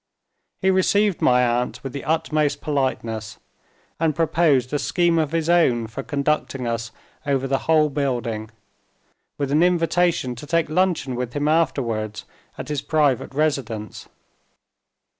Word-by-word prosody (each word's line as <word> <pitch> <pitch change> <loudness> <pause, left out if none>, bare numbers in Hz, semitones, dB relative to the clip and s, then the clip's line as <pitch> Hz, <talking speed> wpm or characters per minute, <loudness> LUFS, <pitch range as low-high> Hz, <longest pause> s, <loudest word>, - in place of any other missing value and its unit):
He 190 - +4
received 200 +1 +2
my 125 0 +4
aunt 120 +1 -1
with 135 -2 -6
the 140 - -5
utmost 155 -2 0
politeness, 115 -7 -2 0.6
and 160 -2 +1
proposed 155 -5 +2
a 145 - +1
scheme 170 0 +1
of 155 -2 0
his 165 -1 -1
own 145 -10 +3
for 115 +5 -6
conducting 140 -2 -1
us 115 -1 -2 0.4
over 135 -1 +1
the 135 0 0
whole 155 -1 +5
building; 125 -6 -2 0.9
with 140 -1 -2
an 150 +3 +3
invitation 175 -5 +2
to 145 - -9
take 165 -1 +1
luncheon 175 -6 +1
with 125 -1 -4
him 145 0 -1
afterwards 115 -9 0 0.3
at 130 - -7
his 150 -2 -2
private 145 -6 +1
residence. 135 -8 -2
145 Hz, 140 wpm, -22 LUFS, 125-160 Hz, 0.9 s, whole